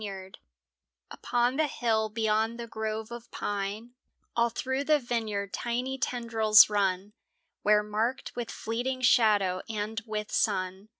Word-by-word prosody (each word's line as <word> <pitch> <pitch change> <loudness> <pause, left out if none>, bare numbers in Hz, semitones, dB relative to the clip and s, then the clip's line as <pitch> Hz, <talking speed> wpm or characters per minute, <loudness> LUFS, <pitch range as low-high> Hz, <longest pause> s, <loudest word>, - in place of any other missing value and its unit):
PON 245 +2 +1
the 310 -1 +2
hill 220 -5 0
beyond 220 +1 0
the 235 - -4
grove 220 0 -4
of 235 0 -9
pine 205 +4 -4 0.4
All 235 0 +3
through 260 +4 -2
the 305 0 +4
vineyard 220 -6 -3
tiny 250 +3 -2
tendrils 225 -3 +5
run, 195 0 0 0.5
Where, 210 0 +4
marked 220 +5 -2
with 240 -2 -4
fleeting 245 +3 -3
shadow 205 -7 +3
and 220 +1 -3
with 210 -1 -4
sun. 190 0 -1
220 Hz, 125 wpm, -28 LUFS, 210-240 Hz, 0.5 s, tendrils